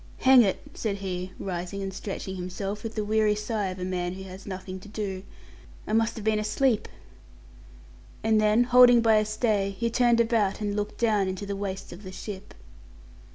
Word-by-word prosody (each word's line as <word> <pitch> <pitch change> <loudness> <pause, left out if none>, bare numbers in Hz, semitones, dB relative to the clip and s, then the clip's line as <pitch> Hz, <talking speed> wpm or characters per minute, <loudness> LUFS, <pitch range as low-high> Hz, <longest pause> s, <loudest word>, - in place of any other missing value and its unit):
"Hang 260 -1 +8
it!" 195 -4 0
said 215 -3 -2
he, 185 -2 -4
rising 185 +1 -4
and 195 0 -4
stretching 190 0 -5
himself, 195 +3 -4
with 225 -1 -6
the 215 - -1
weary 215 0 +2
sigh 210 -1 -2
of 185 0 -5
a 180 - -4
man 180 -1 -2
who 190 +1 -8
has 190 +1 -10
nothing 190 -1 -6
to 185 - -13
do, 200 -3 -4 0.6
"I 215 - -4
must 225 0 +2
have 220 - -7
been 215 -1 +2
asleep"; 220 +2 +1 1.4
and 220 -1 +3
then, 215 +3 +4
holding 245 -1 +7
by 225 -1 +5
a 215 - +2
stay, 215 -2 0
he 235 +2 -1
turned 240 -1 +3
about 225 -4 +2
and 205 -1 -2
looked 210 0 -3
down 215 -4 +2
into 190 +2 -4
the 200 0 -3
waist 195 -2 -5
of 175 - -11
the 185 -2 -9
ship. 190 0 -8
205 Hz, 195 wpm, -27 LUFS, 190-220 Hz, 1.4 s, Hang